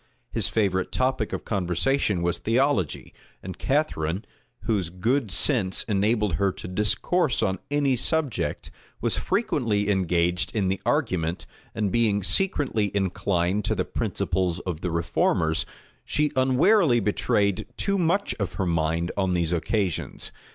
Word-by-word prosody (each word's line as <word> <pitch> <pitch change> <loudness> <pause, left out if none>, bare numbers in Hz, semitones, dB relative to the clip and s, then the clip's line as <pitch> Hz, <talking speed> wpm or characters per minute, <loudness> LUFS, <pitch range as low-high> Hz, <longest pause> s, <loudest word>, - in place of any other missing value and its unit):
His - - 0
favorite 95 -4 0
topic 130 -4 0
of - - -4
conversation 100 +1 0
was 85 0 0
theology; 115 - 0 0.3
and 95 0 -7
Catharine, 100 - -1 0.4
whose 100 -7 0
good 110 +7 0
sense 95 -2 +1
enabled 105 -3 +1
her 100 -1 +3
to - - -8
discourse 105 - +1
on 95 -2 0
any 145 -2 +2
subject, 145 -1 -1 0.3
was - - 0
frequently 120 - 0
engaged 90 -1 +1
in 100 -4 +1
the 95 - -2
argument, 85 -1 0 0.3
and 105 -3 0
being 105 -3 +2
secretly 130 - +1
inclined 95 0 0
to - - 0
the - - -1
principles 90 -1 -1
of 90 -3 -5
the 90 - -2
reformers, 80 -1 +1 0.4
she 150 -1 0
unwarily 130 - +4
betrayed 100 -1 0
too 200 -1 0
much 180 +4 +1
of 95 -4 -2
her 95 - -2
mind 85 0 0
on 95 -2 0
these 85 -1 0
occasions. 95 +1 -2
100 Hz, 135 wpm, -25 LUFS, 90-130 Hz, 0.4 s, unwarily